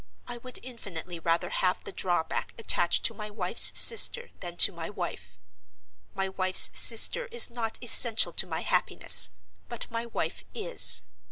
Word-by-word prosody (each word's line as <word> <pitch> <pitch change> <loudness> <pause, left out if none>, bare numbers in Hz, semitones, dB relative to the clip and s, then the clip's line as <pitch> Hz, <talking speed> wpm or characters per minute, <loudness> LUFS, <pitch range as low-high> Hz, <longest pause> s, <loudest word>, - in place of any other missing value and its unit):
—I 245 - -9
would 250 +1 -5
infinitely 185 -8 -12
rather 165 +1 -5
have 180 0 -4
the - - -11
drawback 175 -3 -6
attached 175 -6 -2
to 230 - -1
my 210 0 -12
wife's 205 0 +2
sister 480 +1 +5
than 175 -2 -10
to - - +4
my 165 -2 -10
wife. 100 - -11 0.8
My 195 0 -5
wife's 185 -1 0
sister 235 - +4
is 475 - +3
not 230 -2 -8
essential 230 -1 +2
to - - -3
my - - -8
happiness, - - +2 0.4
but 235 -2 -9
my 230 +1 -8
wife 235 - -8
is. 485 +3 +3
210 Hz, 155 wpm, -24 LUFS, 175-240 Hz, 0.8 s, sister